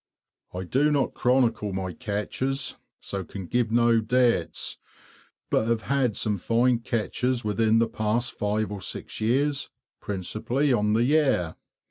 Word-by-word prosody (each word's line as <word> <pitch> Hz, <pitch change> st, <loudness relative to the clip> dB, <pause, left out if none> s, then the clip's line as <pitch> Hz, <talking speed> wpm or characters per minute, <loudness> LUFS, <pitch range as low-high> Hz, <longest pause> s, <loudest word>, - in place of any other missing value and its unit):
I 90 Hz, +1 st, -5 dB
do 135 Hz, -, +2 dB
not 140 Hz, -3 st, +1 dB
chronicle 120 Hz, -5 st, +1 dB
my 95 Hz, -1 st, -3 dB
catches, 130 Hz, -, -2 dB, 0.3 s
so 100 Hz, -1 st, -4 dB
can 95 Hz, +2 st, -8 dB
give 120 Hz, +3 st, 0 dB
no 115 Hz, 0 st, +4 dB
dates; 120 Hz, -5 st, +1 dB, 0.7 s
but 110 Hz, -, +2 dB
have 115 Hz, -2 st, 0 dB
had 135 Hz, -6 st, +1 dB
some 105 Hz, -3 st, -1 dB
fine 120 Hz, +4 st, +2 dB
catches 120 Hz, +2 st, -1 dB
within 110 Hz, +1 st, +2 dB
the 115 Hz, 0 st, +3 dB
past 110 Hz, +2 st, 0 dB
five 105 Hz, +1 st, -1 dB
or 100 Hz, -2 st, -5 dB
six -, -, -4 dB
years, 140 Hz, +6 st, +1 dB, 0.3 s
principally 110 Hz, +8 st, -1 dB
on 105 Hz, -2 st, +2 dB
the 115 Hz, +2 st, +3 dB
Yare. 130 Hz, -, +2 dB
115 Hz, 140 wpm, -26 LUFS, 105-125 Hz, 0.7 s, no